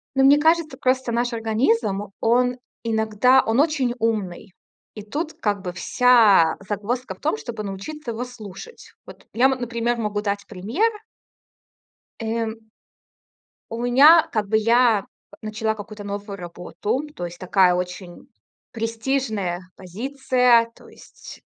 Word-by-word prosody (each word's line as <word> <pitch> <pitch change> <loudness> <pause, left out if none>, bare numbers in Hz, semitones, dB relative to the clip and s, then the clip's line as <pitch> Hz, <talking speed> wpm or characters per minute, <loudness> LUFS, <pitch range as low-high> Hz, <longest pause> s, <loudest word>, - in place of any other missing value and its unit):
Ну, 270 - +3
мне 280 +2 +7
кажется, 320 +1 +2
просто, 255 -1 0
наш 240 +1 -1
организм- 220 -3 0
он 245 +2 +2 0.3
иногда, 225 +3 +3
он 225 +3 +1
очень 285 -5 +1
умный, 205 -5 -2 0.4
и 210 - -8
тут 300 +10 -4
как 205 -2 -2
бы 180 -1 -4
вся 210 -5 +4
загвоздка 215 +2 -3
в - - -27
том, 145 - -1
чтобы 215 +8 -6
научиться 220 +8 -6
его 230 +2 -4
слушать. 245 - -11
Вот - - -14
я, 245 +3 +3
м, 265 -1 +2
например, 235 0 -1
могу 210 -2 -2
дать 200 -1 -3
пример 235 - 0 1.3
Эм. 225 0 -2 1.1
У 230 +1 -4
меня, 285 +7 +7
как 215 -3 -1
бы 220 +2 +2
я 230 -1 +3 0.4
начала 220 0 -2
какую-то 210 0 -9
новую 200 0 -6
работу, 180 +7 -4
то 175 - -4
есть 175 0 -8
такая 185 0 +3
очень 180 0 -6 0.4
престижная 225 -5 -2 0.2
позиция, 245 +3 +1
то - - -18
есть, - - -14
225 Hz, 135 wpm, -22 LUFS, 205-250 Hz, 1.3 s, мне